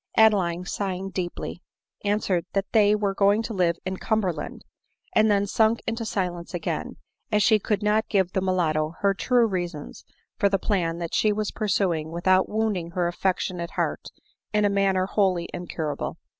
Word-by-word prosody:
Adeline, 185 Hz, -6 st, +4 dB
sighing 195 Hz, 0 st, -3 dB
deeply, 175 Hz, -1 st, -4 dB, 0.4 s
answered, 205 Hz, -4 st, 0 dB
that 195 Hz, 0 st, -1 dB
they 210 Hz, -2 st, +5 dB
were 205 Hz, -2 st, 0 dB
going 200 Hz, +3 st, +3 dB
to 225 Hz, -, -4 dB
live 175 Hz, -4 st, +2 dB
in 190 Hz, 0 st, -3 dB
Cumberland; 185 Hz, -9 st, -2 dB, 0.5 s
and 215 Hz, 0 st, +4 dB
then 200 Hz, -1 st, +3 dB
sunk 220 Hz, +3 st, +2 dB
into 230 Hz, 0 st, -2 dB
silence 180 Hz, -4 st, -3 dB
again, 170 Hz, -, -3 dB, 0.3 s
as 210 Hz, -1 st, +3 dB
she 220 Hz, -2 st, +5 dB
could 210 Hz, 0 st, -1 dB
not 210 Hz, +1 st, +2 dB
give 190 Hz, -3 st, +2 dB
the 190 Hz, -, +1 dB
mulatto 165 Hz, -4 st, 0 dB
her 200 Hz, -1 st, +3 dB
true 240 Hz, +4 st, +2 dB
reasons 175 Hz, -7 st, -4 dB, 0.4 s
for 200 Hz, -, +4 dB
the 195 Hz, -, +2 dB
plan 180 Hz, -4 st, -1 dB
that 170 Hz, -1 st, -5 dB
she 215 Hz, -, +3 dB
was 210 Hz, 0 st, -2 dB
pursuing 180 Hz, -7 st, 0 dB
without 185 Hz, +3 st, +2 dB
wounding 210 Hz, -6 st, -1 dB
her 180 Hz, -1 st, +1 dB
affectionate 175 Hz, -1 st, -1 dB
heart -, -, -2 dB, 0.4 s
in 210 Hz, -1 st, +2 dB
a 205 Hz, -, +2 dB
manner 195 Hz, -2 st, +2 dB
wholly 185 Hz, -4 st, +1 dB
incurable. 160 Hz, -4 st, -4 dB
195 Hz, 165 wpm, -25 LUFS, 175-210 Hz, 0.5 s, they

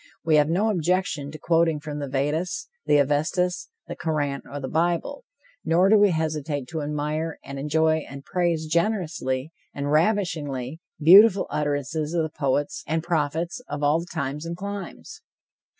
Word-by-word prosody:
We 155 Hz, -2 st, +4 dB
have 150 Hz, 0 st, +3 dB
no 205 Hz, +6 st, +2 dB
objection 175 Hz, -5 st, 0 dB
to 155 Hz, -, -8 dB
quoting 165 Hz, -1 st, +2 dB
from 150 Hz, 0 st, -6 dB
the 145 Hz, -, -4 dB
Veddas, 150 Hz, -, -2 dB, 0.2 s
the 150 Hz, -, +5 dB
Avestas, 155 Hz, +6 st, 0 dB, 0.2 s
the -, -, -6 dB
Koran 145 Hz, -4 st, -2 dB
or 145 Hz, -, -5 dB
the 135 Hz, -, -4 dB
Bible; 170 Hz, -, -1 dB, 0.4 s
nor 175 Hz, +4 st, +3 dB
do 215 Hz, -, +7 dB
we 205 Hz, 0 st, +6 dB
hesitate 155 Hz, -4 st, -2 dB
to 160 Hz, -2 st, -3 dB
admire 150 Hz, +2 st, -2 dB
and 140 Hz, 0 st, -7 dB
enjoy 160 Hz, +2 st, +2 dB
and 140 Hz, 0 st, -9 dB
praise 175 Hz, -3 st, 0 dB
generously 160 Hz, -6 st, -1 dB, 0.2 s
the 140 Hz, -, -3 dB
ravishingly 155 Hz, -, 0 dB, 0.2 s
beautiful 195 Hz, +5 st, +7 dB
utterances 150 Hz, +2 st, -2 dB
of 165 Hz, -, +2 dB
the 160 Hz, -, -2 dB
poets 140 Hz, 0 st, -1 dB
and 160 Hz, +1 st, -1 dB
prophets 165 Hz, -, -1 dB
of 145 Hz, 0 st, -4 dB
all 150 Hz, +3 st, +2 dB
times 150 Hz, -3 st, -4 dB
and 170 Hz, +1 st, -5 dB
climes. 200 Hz, -1 st, -7 dB
155 Hz, 155 wpm, -24 LUFS, 145-175 Hz, 0.4 s, do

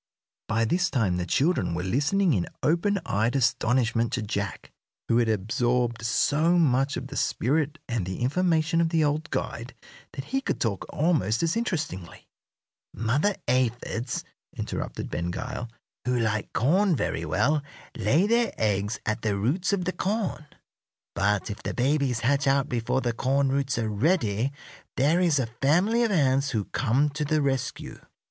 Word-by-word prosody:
By 115 Hz, +1 st, +1 dB
this 175 Hz, -, +1 dB
time 105 Hz, -, +1 dB
the 90 Hz, 0 st, -3 dB
children 135 Hz, -, +1 dB
were 90 Hz, -, -2 dB
listening 145 Hz, -, +2 dB
in 90 Hz, -6 st, 0 dB, 0.2 s
open 175 Hz, +6 st, +2 dB
eyed 110 Hz, +6 st, 0 dB
astonishment 120 Hz, -2 st, +1 dB
to 120 Hz, -, -1 dB
Jack, 100 Hz, -3 st, -4 dB, 0.4 s
who 115 Hz, -, +3 dB
had 115 Hz, -2 st, +2 dB
absorbed 120 Hz, +3 st, 0 dB
so 150 Hz, +9 st, +2 dB
much 140 Hz, -3 st, +2 dB
of 130 Hz, -, -5 dB
the 140 Hz, -, -8 dB
spirit 150 Hz, +4 st, 0 dB
and 115 Hz, -5 st, -1 dB
the 95 Hz, +3 st, -5 dB
information 165 Hz, +3 st, +2 dB
of 165 Hz, -, +2 dB
the 165 Hz, -1 st, +2 dB
old 150 Hz, +1 st, 0 dB
guide 120 Hz, +3 st, -4 dB, 0.4 s
that 135 Hz, -, -5 dB
he 270 Hz, 0 st, -1 dB
could -, -, -2 dB
talk 105 Hz, -5 st, -2 dB
almost 145 Hz, -, +1 dB
as 165 Hz, 0 st, +1 dB
interestingly. 160 Hz, -, -4 dB, 0.7 s
"Mother 140 Hz, -, +1 dB
aphids," 120 Hz, -1 st, -1 dB, 0.3 s
interrupted -, -, -4 dB
Ben 85 Hz, 0 st, -2 dB
Gile, 125 Hz, +5 st, -5 dB, 0.4 s
"who 125 Hz, 0 st, +1 dB
like 110 Hz, -2 st, -1 dB
corn 180 Hz, -, +3 dB
very -, -, -2 dB
well, 150 Hz, +2 st, +1 dB, 0.3 s
lay 165 Hz, +7 st, +2 dB
their 235 Hz, +2 st, +2 dB
eggs 105 Hz, 0 st, 0 dB
at 110 Hz, +1 st, -1 dB
the 105 Hz, -3 st, 0 dB
roots 150 Hz, -, 0 dB
of 190 Hz, -3 st, 0 dB
the 185 Hz, -, -1 dB
corn. 195 Hz, -6 st, -2 dB, 0.7 s
But 105 Hz, +1 st, 0 dB
if 105 Hz, -, -7 dB
the -, -, -4 dB
babies 130 Hz, -2 st, +1 dB
hatch 140 Hz, +3 st, +1 dB
out 135 Hz, 0 st, +3 dB
before 120 Hz, +2 st, -1 dB
the 120 Hz, -2 st, -1 dB
corn 135 Hz, +3 st, +1 dB
roots 135 Hz, -1 st, 0 dB
are 115 Hz, -2 st, 0 dB
ready 110 Hz, -, +1 dB, 0.5 s
there 150 Hz, +6 st, +3 dB
is 170 Hz, -5 st, +3 dB
a 130 Hz, -, +1 dB, 0.2 s
family 180 Hz, +12 st, +3 dB
of 230 Hz, -, +2 dB
ants 140 Hz, -6 st, +2 dB
who 110 Hz, -6 st, -1 dB
come 135 Hz, +4 st, +1 dB
to 150 Hz, +2 st, -3 dB
the 155 Hz, +1 st, +1 dB
rescue. 135 Hz, -2 st, -2 dB
130 Hz, 165 wpm, -26 LUFS, 115-160 Hz, 0.7 s, who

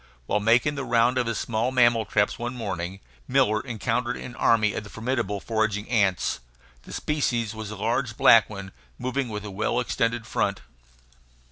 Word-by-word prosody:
While 105 Hz, -, +1 dB
making 120 Hz, +7 st, +3 dB
the 140 Hz, -2 st, -4 dB
round 120 Hz, +1 st, +2 dB
of 120 Hz, -, 0 dB
his 115 Hz, -2 st, -1 dB
small 115 Hz, +2 st, -1 dB
mammal 120 Hz, -3 st, +4 dB
traps 105 Hz, +1 st, +1 dB
one 120 Hz, +2 st, -4 dB
morning, 95 Hz, -4 st, -4 dB, 0.3 s
Miller 110 Hz, +1 st, +2 dB
encountered 120 Hz, 0 st, -2 dB
an 125 Hz, -, -8 dB
army 110 Hz, -2 st, +3 dB
of -, -, -4 dB
the 105 Hz, -, -11 dB
formidable 115 Hz, -3 st, -2 dB
foraging 110 Hz, -1 st, -1 dB
ants. 100 Hz, -7 st, +1 dB, 0.4 s
The -, -, -13 dB
species 120 Hz, -7 st, -1 dB
was 110 Hz, -2 st, -6 dB
a 110 Hz, -, -6 dB
large 115 Hz, +2 st, -1 dB
black 115 Hz, -2 st, +6 dB
one, 100 Hz, -2 st, -8 dB, 0.3 s
moving 130 Hz, 0 st, -2 dB
with 105 Hz, -1 st, -5 dB
a 105 Hz, -, -6 dB
well 105 Hz, +5 st, 0 dB
extended 115 Hz, -2 st, -1 dB
front. -, -, -1 dB
115 Hz, 170 wpm, -25 LUFS, 105-120 Hz, 0.4 s, black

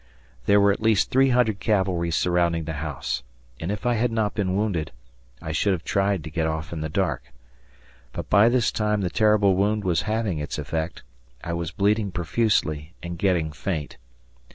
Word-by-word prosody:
There 100 Hz, -, +6 dB
were 100 Hz, 0 st, +5 dB
at 100 Hz, -, -3 dB
least 110 Hz, -2 st, +2 dB
three 135 Hz, +1 st, +4 dB
hundred 120 Hz, -5 st, +2 dB
cavalry 95 Hz, -5 st, +1 dB
surrounding 85 Hz, -1 st, +1 dB
the 80 Hz, +1 st, -4 dB
house, 65 Hz, -5 st, -3 dB, 0.4 s
and, 85 Hz, +4 st, -3 dB
if 105 Hz, +2 st, -5 dB
I 120 Hz, -, +3 dB
had 120 Hz, +1 st, +1 dB
not 110 Hz, -2 st, 0 dB
been 95 Hz, -3 st, -1 dB
wounded, 100 Hz, -7 st, -1 dB, 0.5 s
I 80 Hz, -, -4 dB
should 95 Hz, +5 st, +1 dB
have 85 Hz, -4 st, -4 dB
tried 100 Hz, -3 st, 0 dB
to 80 Hz, -, -8 dB
get 80 Hz, +1 st, 0 dB
off 80 Hz, 0 st, -3 dB
in 80 Hz, -, -4 dB
the 80 Hz, -, -3 dB
dark. -, -, -2 dB, 0.8 s
But -, -, -6 dB
by 105 Hz, +5 st, +5 dB
this 120 Hz, -1 st, +2 dB
time 105 Hz, -1 st, 0 dB
the 90 Hz, -2 st, -1 dB
terrible 105 Hz, -3 st, +3 dB
wound 105 Hz, +2 st, +1 dB
was 90 Hz, -3 st, +1 dB
having 110 Hz, -7 st, -1 dB
its 75 Hz, -, -4 dB
effect; 80 Hz, +2 st, -4 dB, 0.4 s
I 85 Hz, -, -3 dB
was 85 Hz, -1 st, -2 dB
bleeding 100 Hz, +2 st, +1 dB
profusely 85 Hz, -4 st, 0 dB
and 85 Hz, -1 st, -6 dB
getting 85 Hz, -5 st, +1 dB
faint. 75 Hz, -2 st, -4 dB
95 Hz, 185 wpm, -24 LUFS, 80-105 Hz, 0.8 s, There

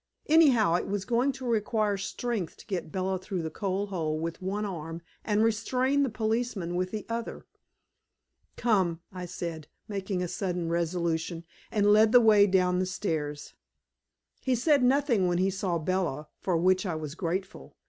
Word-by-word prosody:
Anyhow, 270 Hz, -, +5 dB
it -, -, -4 dB
was 195 Hz, -1 st, -2 dB
going 245 Hz, +5 st, +2 dB
to 260 Hz, 0 st, -8 dB
require 215 Hz, -2 st, +1 dB
strength 195 Hz, -1 st, -3 dB
to -, -, -14 dB
get 185 Hz, -6 st, -4 dB
Bella 190 Hz, 0 st, -1 dB
through 185 Hz, -2 st, -4 dB
the 160 Hz, -, -4 dB
coal 195 Hz, +2 st, -2 dB
hole 165 Hz, -6 st, -2 dB
with 165 Hz, +3 st, -4 dB
one 200 Hz, +3 st, -2 dB
arm 165 Hz, -3 st, -6 dB, 0.2 s
and 210 Hz, 0 st, +2 dB
restrain 250 Hz, +5 st, +1 dB
the 275 Hz, -, +2 dB
policeman 220 Hz, -5 st, -2 dB
with 185 Hz, +1 st, 0 dB
the 215 Hz, +1 st, -5 dB
other. 230 Hz, 0 st, -5 dB, 1.1 s
"Come," 190 Hz, -8 st, +1 dB
I 180 Hz, -1 st, -6 dB
said, 165 Hz, -3 st, -5 dB, 0.2 s
making 195 Hz, -2 st, -2 dB
a -, -, -2 dB
sudden 175 Hz, -2 st, -2 dB
resolution, 170 Hz, 0 st, -1 dB, 0.3 s
and 205 Hz, -1 st, +4 dB
led 215 Hz, +2 st, +5 dB
the 245 Hz, -, +9 dB
way 210 Hz, -3 st, +6 dB
down 180 Hz, -1 st, +2 dB
the 185 Hz, -, 0 dB
stairs. 155 Hz, -6 st, -3 dB, 0.9 s
He 260 Hz, -1 st, +1 dB
said 280 Hz, +3 st, +3 dB
nothing 250 Hz, -6 st, +3 dB
when 175 Hz, -1 st, +1 dB
he 190 Hz, +2 st, +2 dB
saw 185 Hz, -2 st, -1 dB
Bella, 160 Hz, -3 st, -2 dB
for 180 Hz, -3 st, 0 dB
which 185 Hz, +2 st, +3 dB
I 180 Hz, -5 st, -2 dB
was 155 Hz, -2 st, -5 dB
grateful. 185 Hz, +4 st, -4 dB
190 Hz, 170 wpm, -28 LUFS, 170-220 Hz, 1.1 s, the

